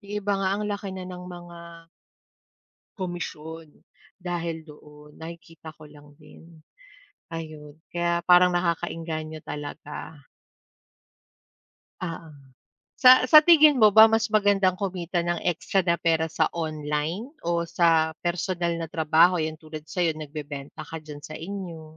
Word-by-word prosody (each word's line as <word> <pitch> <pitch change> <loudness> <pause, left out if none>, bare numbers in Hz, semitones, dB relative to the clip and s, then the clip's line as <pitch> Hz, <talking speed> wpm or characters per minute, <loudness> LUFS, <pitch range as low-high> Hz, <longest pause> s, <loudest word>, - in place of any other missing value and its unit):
yung 205 -1 -11
iba 205 0 -1
nga 190 - +1
ang 210 - -3
laki 200 -1 -4
na 185 - -6
ng 180 0 -8
mga 170 -1 -12 1.1
komisyon 165 -4 -6 0.5
dahil 170 -3 -4
doon, 150 0 -15
nakikita 165 -1 -11
ko 155 -1 -14
lang 145 0 -17
din. 165 +1 -17 0.7
Ayun, 155 -2 -8 0.2
kaya 170 0 0
parang 180 +1 +6
nakaka-engganyo 165 -2 -3
talaga. 150 +1 -7 1.9
Oo. 165 0 -8 0.7
Sa 255 - +10 0.2
sa 305 - +11
tingin 310 -3 +7
mo 220 -4 +7
ba 220 - +11
mas 225 0 0
magandang 200 -3 +3
kumita 180 -2 -2
ng 175 0 -1 0.2
extra 190 +3 -1
na 170 -1 +2
pera 160 -1 +2
sa - - +1 0.2
online 155 - -3 0.2
o 170 - -1 0.3
sa 170 -1 +5 0.4
personal 175 0 -1
na 165 - -4
trabaho? 160 +3 +4
'Yan 155 -1 -3
tulad 155 -1 -9
sayo 175 -3 +1
nagbebenta 150 -1 -8
ka 160 - -5
dyan 150 -1 -9
sa 155 - -7
inyo. 175 -2 -7
170 Hz, 130 wpm, -25 LUFS, 155-180 Hz, 1.9 s, sa